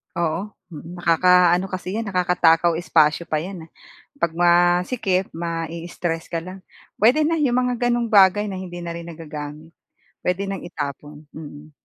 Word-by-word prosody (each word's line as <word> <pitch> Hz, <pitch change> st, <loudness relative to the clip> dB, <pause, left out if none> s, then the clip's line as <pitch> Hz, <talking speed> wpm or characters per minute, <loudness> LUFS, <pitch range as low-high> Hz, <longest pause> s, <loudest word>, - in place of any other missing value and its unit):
Oo. 170 Hz, +4 st, -2 dB, 0.2 s
Mm, 165 Hz, +2 st, -10 dB
nakakaano 180 Hz, +1 st, +4 dB
kasi 185 Hz, -1 st, -6 dB
yan 225 Hz, -, -3 dB
nakakatakaw 175 Hz, -3 st, +2 dB
espasyo 165 Hz, -1 st, +2 dB
pa 155 Hz, -1 st, -1 dB
yan, 180 Hz, -2 st, -8 dB
ah. -, -, -31 dB, 0.5 s
Pag 170 Hz, -, +2 dB
masikip, 180 Hz, +3 st, +2 dB
mai-stress 165 Hz, 0 st, -4 dB
ka 170 Hz, -, -2 dB
lang. 185 Hz, +3 st, -9 dB, 0.3 s
Puwede 255 Hz, +9 st, +3 dB
na 330 Hz, -, +1 dB
yung 275 Hz, -6 st, +1 dB
mga 245 Hz, -1 st, 0 dB
ganong 240 Hz, 0 st, 0 dB
bagay 205 Hz, -1 st, +5 dB
na 200 Hz, -, -5 dB
hindi 185 Hz, -2 st, -7 dB
na 170 Hz, -1 st, -6 dB
rin 170 Hz, 0 st, -8 dB
nagagamit. 155 Hz, 0 st, -9 dB, 0.5 s
Puwede 180 Hz, +2 st, -1 dB
nang 195 Hz, -1 st, -4 dB
itapon. 145 Hz, -1 st, -7 dB
Mm. 150 Hz, 0 st, -11 dB
175 Hz, 150 wpm, -22 LUFS, 165-195 Hz, 0.5 s, bagay